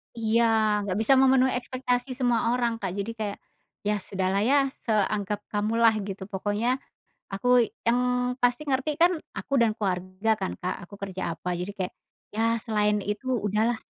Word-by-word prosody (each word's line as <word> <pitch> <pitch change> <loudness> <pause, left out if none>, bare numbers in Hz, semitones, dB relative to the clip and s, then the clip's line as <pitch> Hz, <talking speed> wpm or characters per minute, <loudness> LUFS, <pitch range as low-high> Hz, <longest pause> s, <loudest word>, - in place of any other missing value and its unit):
Iya. 230 +1 +2 0.4
Nggak 185 +1 -1
bisa 245 +5 +5
memenuhi 260 -1 +5
ekspektasi 250 0 -2
semua 245 -2 +1
orang, 235 -2 0
Kak, 190 -2 -3
jadi 205 +3 -3
kayak, 205 -2 -3 0.5
"ya 210 0 0
sudahlah 190 0 -1
ya, 275 -1 +3 0.2
seanggap 210 -1 0
kamulah," 220 +2 +3 0.2
gitu 195 0 -5
pokoknya, 205 +6 -1 0.5
aku 245 +3 +4 0.2
yang 235 +2 +2 0.4
pasti 245 +2 +2
ngerti 265 +3 +1
kan 350 - +7 0.2
aku 275 -1 -2
dan 225 -2 +3
keluarga 185 +1 -1
kan, 190 -2 -3
Kak, 180 - -2
aku 200 - -19
kerja 190 -3 -3
apa, 180 +3 -6
jadi 180 +3 -4
kayak, 185 -1 -3 0.4
"ya, 225 +1 +1 0.2
selain 210 -2 +1
itu 205 +5 -4 0.2
udahlah." 220 +3 0
220 Hz, 155 wpm, -26 LUFS, 200-245 Hz, 0.5 s, kan